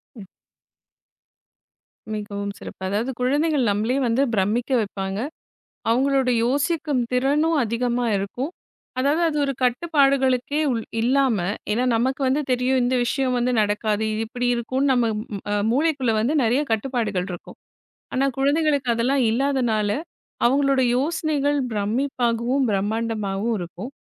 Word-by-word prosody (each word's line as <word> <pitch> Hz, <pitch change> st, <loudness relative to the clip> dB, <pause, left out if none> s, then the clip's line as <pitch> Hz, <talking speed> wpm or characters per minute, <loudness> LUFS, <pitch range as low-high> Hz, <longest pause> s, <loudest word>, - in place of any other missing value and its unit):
ம். 210 Hz, -4 st, -10 dB, 1.9 s
மிகவும் 200 Hz, -1 st, -4 dB
சிறப்பு. -, -, -10 dB
அதாவது 220 Hz, +7 st, -1 dB
குழந்தைகள் 280 Hz, -1 st, +1 dB
நம்மளையே 225 Hz, +7 st, 0 dB
வந்து 235 Hz, +4 st, +2 dB
பிரம்மிக்க 215 Hz, +7 st, 0 dB
வைப்பாங்க. 195 Hz, -1 st, -4 dB, 0.7 s
அவங்களோட 265 Hz, +1 st, +2 dB
யோசிக்கும் 285 Hz, +1 st, 0 dB
திறனும் 295 Hz, +6 st, +2 dB
அதிகமா 240 Hz, +2 st, -1 dB
இருக்கும். 220 Hz, +9 st, -3 dB, 0.5 s
அதாவது 290 Hz, +6 st, +2 dB
அது 300 Hz, -, -3 dB
ஒரு 275 Hz, -, 0 dB
கட்டுப்பாடுகளுக்கே 275 Hz, 0 st, +2 dB
உ -, -, +1 dB, 0.3 s
இல்லாம, 255 Hz, -1 st, +2 dB, 0.3 s
ஏன்னா 245 Hz, +4 st, +1 dB
நமக்கு 260 Hz, +4 st, 0 dB
வந்து 265 Hz, +3 st, +2 dB
தெரியும் 255 Hz, +1 st, +2 dB
இந்த 250 Hz, +1 st, +1 dB
விஷயம் 255 Hz, 0 st, 0 dB
வந்து 245 Hz, +1 st, +1 dB
நடக்காது, 210 Hz, +1 st, 0 dB
இது 220 Hz, +1 st, -2 dB
இப்படி 245 Hz, +1 st, -3 dB
இருக்கும்னு 260 Hz, +4 st, 0 dB
நம்ம 245 Hz, -2 st, +2 dB, 0.7 s
மூளைக்குள்ள 275 Hz, -4 st, +1 dB
வந்து 265 Hz, +8 st, +1 dB
நிறைய 250 Hz, +6 st, +2 dB
கட்டுப்பாடுகள் 220 Hz, -5 st, -1 dB
இருக்கும். 175 Hz, -, -9 dB, 0.6 s
ஆனா 265 Hz, +1 st, +2 dB
குழந்தைகளுக்கு 285 Hz, -1 st, +2 dB
அதெல்லாம் 255 Hz, +3 st, +1 dB
இல்லாததனால 240 Hz, -5 st, +1 dB, 0.6 s
அவங்களோட 275 Hz, +1 st, +3 dB, 0.2 s
யோசனைகள் 290 Hz, -1 st, 0 dB
பிரம்மிப்பாகவும், 240 Hz, +3 st, 0 dB
பிரம்மாண்டமாகவும் 215 Hz, +1 st, -1 dB
இருக்கும். 175 Hz, +7 st, -7 dB
250 Hz, 115 wpm, -23 LUFS, 225-275 Hz, 1.9 s, அவங்களோட